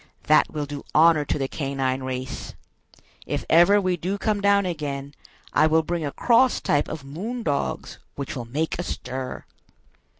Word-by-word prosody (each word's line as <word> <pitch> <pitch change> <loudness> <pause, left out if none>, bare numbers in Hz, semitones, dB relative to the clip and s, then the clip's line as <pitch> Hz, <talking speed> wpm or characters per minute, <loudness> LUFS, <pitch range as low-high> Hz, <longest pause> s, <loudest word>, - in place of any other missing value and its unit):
That 155 - +4
will 150 -1 -3
do 145 0 -7
honor 160 -1 +6
to 140 - -1
the 135 -2 -1
canine 135 -2 -2
race! 130 0 -5 0.7
If - - -2
ever 175 +5 +6
we 185 -2 0
do 185 +4 -2
come 205 0 0
down 200 0 +4
again, 145 -5 -4 0.4
I 155 - +5
will 160 +1 +3
bring 170 0 -2
a 145 - -2
cross 245 - +3
type 145 0 +1
of 155 -3 -6
'moon 205 - -5
dogs,' 145 -6 -2 0.2
which 140 0 -5
will 120 -3 -5
make 155 +8 -2
a - - -1
stir!" 130 -6 -5
155 Hz, 170 wpm, -24 LUFS, 140-180 Hz, 0.7 s, honor